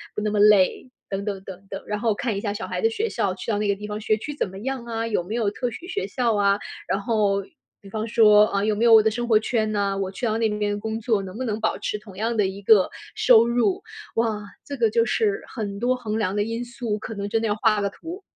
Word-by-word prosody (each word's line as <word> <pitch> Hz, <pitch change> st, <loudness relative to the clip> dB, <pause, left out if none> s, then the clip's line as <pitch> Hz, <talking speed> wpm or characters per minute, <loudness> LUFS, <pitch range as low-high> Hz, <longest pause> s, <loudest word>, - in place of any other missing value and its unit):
不 -, -, -2 dB
那 210 Hz, -, 0 dB
么 210 Hz, -, 0 dB
累， 205 Hz, +3 st, +4 dB, 0.2 s
等 195 Hz, 0 st, -3 dB
等 200 Hz, -2 st, -3 dB
等 195 Hz, 0 st, -10 dB
等， 195 Hz, -1 st, -6 dB
然 210 Hz, 0 st, -2 dB
后 225 Hz, -2 st, +1 dB
看 230 Hz, -2 st, -2 dB
一 200 Hz, -, -3 dB
下 205 Hz, -, -2 dB
小 220 Hz, +2 st, -5 dB
孩 -, -, -3 dB
的 450 Hz, -, +3 dB
学 450 Hz, 0 st, -1 dB
校 185 Hz, -2 st, -1 dB
去 210 Hz, -, -4 dB
到 205 Hz, -, 0 dB
那 210 Hz, -, 0 dB
个 200 Hz, -, +2 dB
地 210 Hz, +1 st, -8 dB
方 210 Hz, +1 st, -5 dB
学 215 Hz, 0 st, +1 dB
区 295 Hz, +7 st, -6 dB
怎 200 Hz, -, -1 dB
么 190 Hz, -, -10 dB
样 260 Hz, +2 st, -3 dB
啊？ 225 Hz, -1 st, -3 dB
有 210 Hz, -6 st, 0 dB
没 210 Hz, +6 st, -5 dB
有 220 Hz, -4 st, +1 dB
特 245 Hz, +4 st, -2 dB
许 250 Hz, +10 st, -9 dB
学 405 Hz, +1 st, -3 dB
校 235 Hz, -4 st, 0 dB
啊。 200 Hz, -1 st, +3 dB, 0.3 s
然 195 Hz, -, 0 dB
后 200 Hz, -2 st, +1 dB, 0.4 s
比 200 Hz, -, -13 dB
方 220 Hz, 0 st, -3 dB
说， 210 Hz, -2 st, +6 dB
啊， 200 Hz, 0 st, -1 dB
有 215 Hz, -1 st, +1 dB
没 215 Hz, -, -1 dB
有 230 Hz, -, +6 dB
我 220 Hz, -, +7 dB
的 220 Hz, -, +2 dB
生 240 Hz, +2 st, -3 dB
活 220 Hz, -2 st, +5 dB
圈 220 Hz, -1 st, 0 dB
呢？ 200 Hz, -2 st, 0 dB
我 190 Hz, -1 st, -2 dB
去 245 Hz, -, -4 dB
到 220 Hz, -1 st, +1 dB
那 225 Hz, -1 st, +2 dB
边 205 Hz, -1 st, -1 dB
工 220 Hz, +1 st, -3 dB
作， 220 Hz, -3 st, +1 dB
能 190 Hz, +3 st, -8 dB
不 260 Hz, -, -3 dB
能 220 Hz, -3 st, -2 dB
保 220 Hz, -, 0 dB
持 210 Hz, -, -3 dB
同 200 Hz, -3 st, -14 dB
样 225 Hz, +2 st, -1 dB
的 205 Hz, -, +3 dB
一 195 Hz, +1 st, -7 dB
个 200 Hz, -2 st, +5 dB, 0.3 s
收 230 Hz, -1 st, +6 dB
入？ 235 Hz, -5 st, +1 dB, 0.3 s
哇， 220 Hz, -2 st, 0 dB, 0.2 s
这 285 Hz, -, -5 dB
个 230 Hz, -3 st, +3 dB
就 230 Hz, +2 st, +2 dB
是 420 Hz, -, 0 dB
很 205 Hz, -4 st, -5 dB
多 250 Hz, +1 st, +2 dB
衡 220 Hz, -3 st, -3 dB
量 200 Hz, -2 st, -1 dB
的 205 Hz, -, +1 dB
因 230 Hz, +2 st, -3 dB
素， 240 Hz, -3 st, -3 dB
可 225 Hz, -, -6 dB
能 200 Hz, -1 st, -4 dB
真 225 Hz, 0 st, +1 dB
的 -, -, +1 dB
要 205 Hz, -, +1 dB
画 215 Hz, -1 st, +2 dB
个 200 Hz, -, 0 dB
图。 340 Hz, -, -8 dB
215 Hz, 300 characters per minute, -24 LUFS, 205-230 Hz, 0.4 s, 我